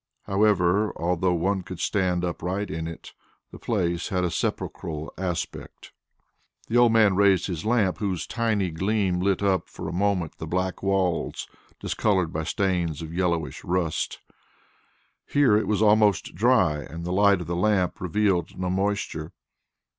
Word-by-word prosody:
However, 100 0 +2
although 90 +1 +1
one 95 +3 0
could 90 -1 -9
stand 90 -3 0
upright 90 +4 -3
in 80 +1 -4
it, 80 - -9 0.4
the - - -11
place 85 -6 -1
had 90 -1 0
a 90 - 0
sepulchral 80 -1 -3
aspect. 90 -2 -5 0.8
The 115 - -3
old 120 -1 +6
man 110 -4 +4
raised 95 -2 +4
his 85 -2 -4
lamp, 105 -7 +1
whose 95 -5 -2
tiny 110 -6 0
gleam 95 +1 0
lit 95 +1 +1
up 95 -3 +1
for - - -7
a - - -4
moment 95 -3 -1
the - - -5
black 95 +1 -2
walls 95 -3 -1 0.3
discoloured 95 -6 0
by 80 0 -2
stains 90 -6 -1
of 80 0 -7
yellowish 85 -3 -1
rust. 85 -3 -1 1.1
Here 140 -7 +4
it 110 - +1
was 105 0 +1
almost 105 -2 +3
dry 75 -1 +3
and 80 +4 -8
the 90 - -2
light 100 0 +4
of - - -5
the 85 +2 -3
lamp 90 -1 +1
revealed 95 0 0
no 90 -1 -1
moisture. 95 -5 -2
95 Hz, 155 wpm, -25 LUFS, 85-100 Hz, 1.1 s, old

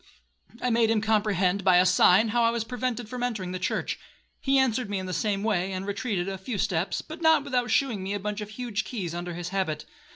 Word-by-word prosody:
I 250 - +1
made 230 -1 +3
him 225 -1 +3
comprehend, 205 -3 +1
by 185 -1 +5
a 180 - +5
sign, 185 +4 +5
how 240 +2 +2
I 230 - +4
was 230 -1 -1
prevented 245 -1 -3
from 250 +2 -6
entering 215 -7 -2
the 185 - -4
church; 180 - -2 0.4
he 270 0 +2
answered 250 -4 +1
me 205 - -1
in 190 - -4
the 185 - -4
same 205 -1 0
way, 195 -4 0
and 190 0 -4
retreated 200 -3 -2
a 195 -1 -4
few 205 +3 -4
steps, 180 -1 -1
but 315 +2 -9
not 320 -3 +5
without 250 -3 -1
shewing 240 -8 +1
me 195 +2 -3
a - - -2
bunch 210 +1 -3
of 210 - -6
huge 225 -1 -3
keys 190 -10 -4
under 175 0 -5
his 175 0 -5
habit. 185 -6 -2
210 Hz, 235 wpm, -27 LUFS, 185-240 Hz, 0.4 s, by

